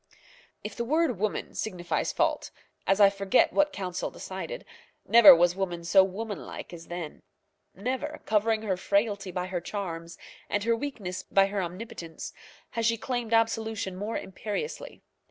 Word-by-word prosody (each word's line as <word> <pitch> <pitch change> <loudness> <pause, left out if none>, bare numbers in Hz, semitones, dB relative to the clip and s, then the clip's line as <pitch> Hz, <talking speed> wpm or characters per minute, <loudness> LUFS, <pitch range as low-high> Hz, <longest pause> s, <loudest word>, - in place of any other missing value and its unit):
If 210 -1 -6
the 235 - -2
word 310 - +1
woman 215 0 -2
signifies 180 -5 -2
fault, - - 0 0.4
as 195 +1 +3
I 200 -1 +8
forget 195 +3 +2
what 295 0 +3
Council 185 -7 -3
decided, - - -6 0.4
never 230 -5 +10
was 175 +1 +3
woman 175 -3 -3
so 190 +3 +6
womanlike 200 0 -6
as 165 -1 -10
then. 175 -3 -6 0.5
Never, 260 +9 -3
covering 220 +1 +2
her 190 -4 0
frailty 200 0 0
by 180 0 -3
her 185 -2 -3
charms, 170 -3 -5 0.3
and 205 - 0
her 230 +1 +3
weakness 225 -9 -4
by 195 0 +3
her 195 0 -2
omnipotence, 180 -2 -7 0.4
has 230 -1 0
she 230 0 +2
claimed 240 -1 -3
absolution 225 -3 +1
more 205 +4 -3
imperiously. 210 - -5
200 Hz, 150 wpm, -28 LUFS, 185-230 Hz, 0.5 s, never